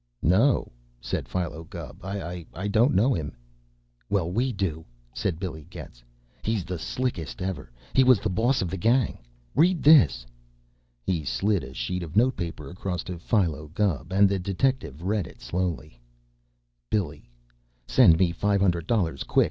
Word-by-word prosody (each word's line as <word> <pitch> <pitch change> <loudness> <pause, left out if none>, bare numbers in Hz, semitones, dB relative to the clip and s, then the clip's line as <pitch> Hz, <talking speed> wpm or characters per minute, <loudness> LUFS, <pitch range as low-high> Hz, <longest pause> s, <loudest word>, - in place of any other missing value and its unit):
"No," 110 - +3 0.3
said - - -3
Philo 85 -3 -3
Gubb. 80 - -9
"I 95 -1 -5
don't 115 +3 +4
know 120 +8 +4
him." 75 -4 -4 0.7
"Well, 90 -4 0
we 125 +7 +1
do," 95 -7 -2 0.3
said 90 - -2
Billy 80 -6 -6
Getz. - - -11 0.4
"He's 110 -5 -1
the 90 -1 -4
slickest 110 -3 -3
ever. 90 -9 -4 0.2
He 130 - +6
was 130 -4 +6
the - - -2
boss 115 +4 +2
of 85 - -4
the 95 - -3
gang. 120 +1 +2 0.3
Read 170 +2 +3
this!" 75 - +6 0.8
He 85 +2 -1
slid 95 - 0
a 65 0 -10
sheet 90 0 -2
of 80 -2 -7
note 125 +3 +4
paper 80 -4 -5
across 90 -1 -4
to 90 -2 -6
Philo 85 -5 0
Gubb, 95 -5 0
and 100 +1 +5
the 100 0 0
detective 95 - -1
read 100 -1 0
it - - -14
slowly: 85 -8 -3 0.9
Billy: 80 - -2 0.6
Send 80 +5 +6
me 90 -1 +3
five 100 +3 +1
hundred 85 -4 +1
dollars 85 - 0
quick. - - +1
95 Hz, 155 wpm, -26 LUFS, 80-105 Hz, 0.9 s, He